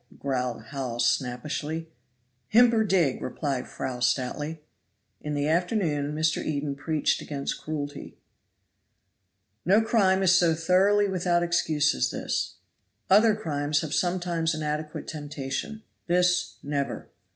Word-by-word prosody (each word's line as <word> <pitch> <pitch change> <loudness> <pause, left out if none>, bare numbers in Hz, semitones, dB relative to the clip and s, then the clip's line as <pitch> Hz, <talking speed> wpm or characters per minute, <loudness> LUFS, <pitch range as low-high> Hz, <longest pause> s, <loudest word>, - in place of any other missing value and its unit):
growled 125 -4 -2
Hawes 125 -4 -2
snappishly. 150 +6 -2 0.6
"Himper 230 -2 +5
dig!" 170 -9 +2
replied 135 -1 -3
Fry 130 -2 -5
stoutly. 145 +5 -1 0.6
In 150 0 -3
the 145 0 0
afternoon 160 -4 0
Mr. 155 0 +1
Eden 145 -1 -2
preached 150 +2 0
against 140 -2 -4
cruelty. 145 -2 -6 1.5
"No 195 +5 +5
crime 195 -4 +3
is 185 - +5
so 175 -3 +4
thoroughly 190 +5 +3
without 175 -2 +1
excuse 160 -4 +2
as 65 - 0
this. - - -3 0.6
Other 215 +2 +6
crimes 145 -7 -1
have 155 -2 -4
sometimes 175 -2 0
an 155 - -4
adequate 150 0 -4
temptation, 145 +8 -5 0.2
this 180 +1 +2
never. 140 -1 -3
155 Hz, 120 wpm, -27 LUFS, 145-180 Hz, 1.5 s, Other